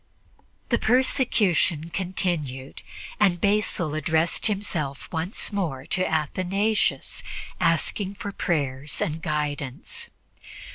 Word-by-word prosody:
The 235 - +3
persecution 210 - +2
continued, 165 -8 -2 0.4
and 190 -4 +4
Basil 200 -6 +1
addressed 160 +4 +2
himself 175 -9 -2
once 170 +6 -1
more 155 -10 -1
to 185 - +1
Athanasius, 185 +1 +1 0.4
asking 190 +4 +1
for 200 - -5
prayers 145 -6 -1
and 160 +1 -1
guidance. 145 -5 -3
170 Hz, 90 wpm, -26 LUFS, 150-200 Hz, 0.4 s, and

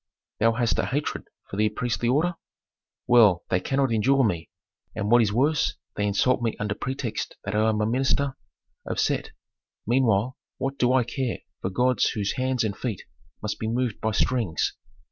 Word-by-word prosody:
"Thou 115 +1 +4
hast 120 0 +1
a - - 0
hatred 145 +3 -2 0.2
for 95 - -7
the 105 0 +3
priestly 115 +1 -1
order?" 160 +7 +2 0.7
"Well, 105 -8 +5
they 90 - +3
cannot 135 +5 0
endure 135 +5 +3
me, 85 -8 -1 0.5
and 105 0 -2
what 120 0 +7
is 105 -3 +2
worse 140 +7 +2 0.2
they 105 - 0
insult 110 +6 +2
me 115 -2 -1
under 105 -1 -1
pretext 115 -3 -4
that 100 - -4
I 110 +1 +3
am 110 -1 0
a - - +2
minister 130 +3 +1 0.5
of - - -3
Set. - - 0 0.6
Meanwhile, 120 0 +2 0.2
what 135 +1 -3
do 125 0 +3
I 130 -1 +4
care 120 +1 -3 0.2
for 95 - -1
gods 125 +6 +2
whose 105 -2 -1
hands 130 -1 +1
and 105 -3 -1
feet 115 -7 -4 0.4
must - - -3
be 110 - -2
moved 120 -1 -1
by 110 - +1
strings. 110 -5 0
115 Hz, 180 wpm, -25 LUFS, 105-130 Hz, 0.7 s, what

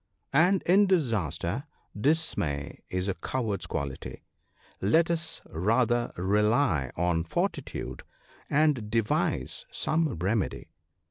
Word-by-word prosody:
' - - -40
And 190 0 +1
in 195 +3 +5
disaster, 110 - 0 0.3
dismay 105 - 0
is 90 +1 -2
a 100 - +1
coward's 110 -1 -3
quality; 70 -2 -5 0.6
let 160 - +3
us 170 -1 -2
rather 115 +7 +1
rely 105 - +2
on 85 -1 +1
fortitude, 65 -6 -3 0.5
and 145 -7 +2
devise 115 -1 0
some 160 0 +1
remedy. 95 +5 -1
110 Hz, 105 wpm, -28 LUFS, 90-150 Hz, 0.6 s, in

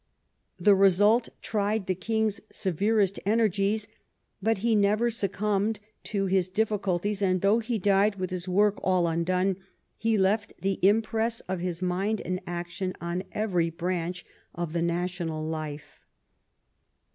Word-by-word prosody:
The 200 +3 +6
result 205 +4 +4
tried 210 -1 0
the 185 - 0
king's 220 +2 -1
severest 200 +1 +1
energies, 210 0 +1 0.5
but 225 +3 +2
he 235 - +3
never 215 +3 +3
succumbed 210 0 0 0.3
to 200 -2 -1
his 185 -1 +1
diffi 210 +1 0
culties, 195 +2 -1
and 185 -2 +2
though 205 +3 +4
he 230 0 -2
died 200 +1 +3
with 185 -2 -4
his 180 0 -4
work 205 +2 +2
all 185 -2 +2
undone, 180 +3 0 0.4
he 225 -1 +2
left 205 +3 +1
the 195 0 -1
impress 225 +3 +2
of 185 -1 -4
his 175 0 -3
mind 195 +4 0
and 185 0 -3
action 175 +2 -4
on 170 +1 -3
every 180 -6 0
branch 175 +1 -3 0.3
of 170 -2 -4
the 170 - 0
national 170 -2 -2
life. 150 -2 -6
195 Hz, 140 wpm, -27 LUFS, 180-210 Hz, 0.5 s, The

